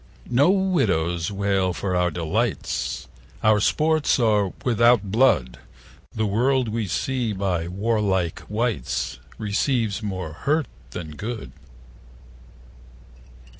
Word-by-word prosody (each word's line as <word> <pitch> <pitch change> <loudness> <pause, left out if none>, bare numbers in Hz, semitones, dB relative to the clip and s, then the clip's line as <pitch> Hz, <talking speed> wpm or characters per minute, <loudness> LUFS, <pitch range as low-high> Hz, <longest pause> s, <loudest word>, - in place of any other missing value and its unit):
No 135 +7 +5
widows 100 - +1
wail 100 -2 +1
for 90 +1 -2
our 90 0 +2
delights, 90 +7 -2 0.4
Our 110 -1 +5
sports 155 +6 +2
are 105 -5 +2
without 115 -4 +3
blood; 100 - +3 0.6
The 110 - 0
world 125 +4 +1
we 110 -1 -2
see 120 +3 -1
by 95 -4 -1
warlike 95 -3 0
wights 115 +2 -1 0.2
55 - - -26
Receives 110 0 0
more 95 -7 -4
hurt 150 - 0 0.2
than 80 +4 -7
good. 110 +8 -6
105 Hz, 105 wpm, -24 LUFS, 95-120 Hz, 0.6 s, No